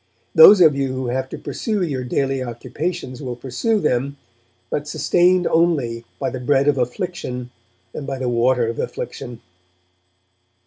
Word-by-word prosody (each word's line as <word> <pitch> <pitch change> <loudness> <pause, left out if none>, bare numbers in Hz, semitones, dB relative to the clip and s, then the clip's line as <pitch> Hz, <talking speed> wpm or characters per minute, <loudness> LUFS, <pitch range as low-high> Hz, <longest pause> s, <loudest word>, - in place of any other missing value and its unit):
'Those 185 +5 +9
of 155 -4 +6
you 135 -1 -1
who 130 -1 -3
have 130 +1 -2
to - - -6
pursue 215 -4 -3
your 135 -7 -2
daily 135 +2 -1
occupations 130 +4 -5
will 125 -3 -4
pursue 135 - -1
them, 140 -3 -1 0.5
but 145 0 -2
sustained 180 +3 +2
only 140 -9 +1
by - - -2
the 130 - -5
bread 135 +2 +2
of 145 -2 +3
affliction 125 -2 -4 0.4
and 140 - -6
by 135 - -3
the 130 -1 -3
water 120 +1 +2
of 115 - -4
affliction.' 120 -2 -6
135 Hz, 150 wpm, -20 LUFS, 125-160 Hz, 0.5 s, Those